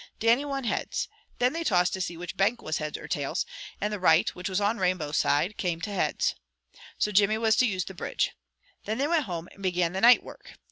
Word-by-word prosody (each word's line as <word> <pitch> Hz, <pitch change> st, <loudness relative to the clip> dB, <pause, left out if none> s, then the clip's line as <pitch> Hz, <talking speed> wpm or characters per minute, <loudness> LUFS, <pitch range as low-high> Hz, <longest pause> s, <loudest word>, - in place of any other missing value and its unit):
Dannie 235 Hz, +5 st, +3 dB
won 275 Hz, -1 st, -3 dB
heads. 230 Hz, -, -2 dB, 0.3 s
Then 250 Hz, +2 st, +2 dB
they 335 Hz, +1 st, -2 dB
tossed 180 Hz, -, +2 dB
to 190 Hz, -, -2 dB
see 175 Hz, -2 st, -3 dB
which 180 Hz, +2 st, -6 dB
bank 205 Hz, +5 st, +2 dB
was 155 Hz, -6 st, -3 dB
heads 150 Hz, -1 st, -4 dB
or -, -, -9 dB
tails, 140 Hz, -2 st, -1 dB, 0.3 s
and 210 Hz, +1 st, -1 dB
the 210 Hz, -, -3 dB
right, 160 Hz, -3 st, +4 dB
which 180 Hz, +3 st, -5 dB
was 190 Hz, +1 st, 0 dB
on 210 Hz, +3 st, 0 dB
Rainbow 180 Hz, -5 st, 0 dB
side, 160 Hz, +7 st, +1 dB
came 175 Hz, -3 st, -1 dB
heads. 195 Hz, +2 st, 0 dB, 0.6 s
So 210 Hz, -, +1 dB
Jimmy 210 Hz, +2 st, +4 dB
was 220 Hz, -1 st, +3 dB
to 255 Hz, -, +4 dB
use 185 Hz, -4 st, -1 dB
the 190 Hz, -, -8 dB
bridge. -, -, -1 dB, 0.5 s
Then 215 Hz, +1 st, -2 dB
they 280 Hz, +3 st, +1 dB
went 330 Hz, -2 st, +2 dB
home, 175 Hz, -3 st, -5 dB
and 195 Hz, -, -16 dB
began 180 Hz, -2 st, 0 dB
the 190 Hz, -, -2 dB
night 245 Hz, +1 st, +7 dB
work. -, -, -12 dB
195 Hz, 225 wpm, -27 LUFS, 175-225 Hz, 0.6 s, night